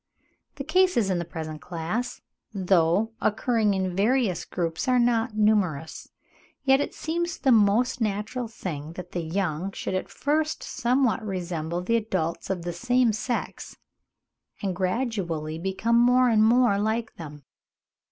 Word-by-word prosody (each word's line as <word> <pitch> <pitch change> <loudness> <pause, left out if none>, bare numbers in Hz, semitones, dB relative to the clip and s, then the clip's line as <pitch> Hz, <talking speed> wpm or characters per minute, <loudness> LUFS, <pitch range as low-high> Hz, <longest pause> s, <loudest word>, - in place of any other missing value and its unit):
The 275 - -5
cases 315 - +2
in 180 - 0
the 170 - -3
present 155 -2 -6
class, 180 +8 -4 0.3
though 190 +2 +2
occurring 215 -1 +1
in 185 -2 -2
various 215 -2 +1
groups, 165 +5 -3
are 255 0 +4
not 235 -2 +1
numerous; 195 -8 +1 0.5
yet 270 0 +4
it - - -4
seems 340 +1 -2
the 270 - +2
most 225 +3 +3
natural 215 +3 -2
thing 160 -8 -6
that 180 0 -9
the 175 - -2
young 170 +1 -2
should - - -4
at 185 - -2
first 305 +2 -1
somewhat 245 -1 +1
resemble 175 -3 -3
the 230 +5 +2
adults 185 -7 -2
of 185 -3 -2
the 175 0 -3
same 245 +3 +2
sex, 215 +4 -4 0.9
and 190 -2 -1
gradually 185 -6 -2
become 195 +6 +1
more 250 +1 +5
and 215 -2 +4
more 235 -2 +4
like 220 +2 -1
them. 150 -3 -9
210 Hz, 140 wpm, -26 LUFS, 175-240 Hz, 0.9 s, more